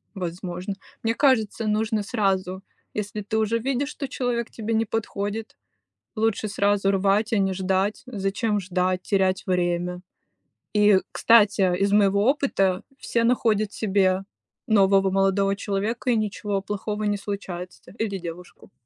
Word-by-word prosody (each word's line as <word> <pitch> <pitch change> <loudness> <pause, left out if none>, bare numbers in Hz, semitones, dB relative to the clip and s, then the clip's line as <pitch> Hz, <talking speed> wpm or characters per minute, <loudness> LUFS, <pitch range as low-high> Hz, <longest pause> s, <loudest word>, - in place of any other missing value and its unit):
Возможно. 180 +1 -4 0.3
Мне 225 0 +1
кажется, 230 -5 +2
нужно 215 0 +1
сразу, 195 -3 -1 0.3
если 210 0 -4
ты 210 +2 -2
уже 220 +1 +1
видишь, 270 +3 -1
что 285 -2 -5
человек 245 -3 -2
тебе 225 0 -4
не 225 0 +2
подходит, 215 0 -4 0.6
лучше 220 0 0
сразу 200 -1 +1
рвать, 200 +3 +1
а - - +3
не 195 -1 +1
ждать. 190 +2 0
Зачем 210 -1 -1
ждать, 185 0 -1
терять 190 -1 +1
время? 180 -1 -1 0.7
И, 210 -2 +5
кстати, 205 -5 +4
из 200 +2 +1
моего 200 -1 +4
опыта 195 -10 +1 0.2
все 230 -2 0
находят 220 -3 +2
себе 190 -2 +1 0.4
нового 195 -2 +4
молодого 195 +1 +2
человека- 210 +5 -2
и 240 - +3
ничего 205 -2 -2
плохого 210 +1 -3
не 205 -1 0
случается. 190 -4 -7
Или 205 -3 -2
девушку. 175 +1 -10
200 Hz, 135 wpm, -24 LUFS, 190-220 Hz, 0.7 s, И